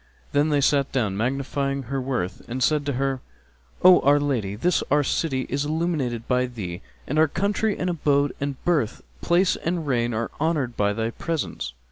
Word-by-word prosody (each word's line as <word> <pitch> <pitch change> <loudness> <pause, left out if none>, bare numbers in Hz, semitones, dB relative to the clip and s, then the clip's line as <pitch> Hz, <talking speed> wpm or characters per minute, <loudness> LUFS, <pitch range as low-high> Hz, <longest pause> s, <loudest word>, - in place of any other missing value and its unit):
Then 145 +2 +2
they 145 -1 +2
sat 140 0 +2
down, 110 -7 0
magnifying 135 +4 -1
her 135 +2 -3
worth 125 -9 -3
and 125 +2 -1
said 150 0 +2
to 140 - 0
her, 135 0 -1 0.6
"O 180 0 +9
our 145 +1 +5
lady, 120 -9 -1
this 170 +10 +1
our 145 0 +3
city 135 -3 -1
is 140 +2 -1
illumined 150 -7 -1
by 125 0 +2
thee, 100 -7 -6 0.2
and 150 +3 0
our 160 - +6
country 200 +6 0
and 180 - -2
abode 145 -5 +1
and 140 -1 -1
birth 150 -11 0 0.2
place 180 +2 +3
and 170 -1 -2
reign 120 -4 +1
are 115 +1 -2
honoured 150 -7 0
by 105 0 +1
thy 115 +2 -2
presence. 145 - -4
140 Hz, 180 wpm, -24 LUFS, 120-155 Hz, 0.6 s, O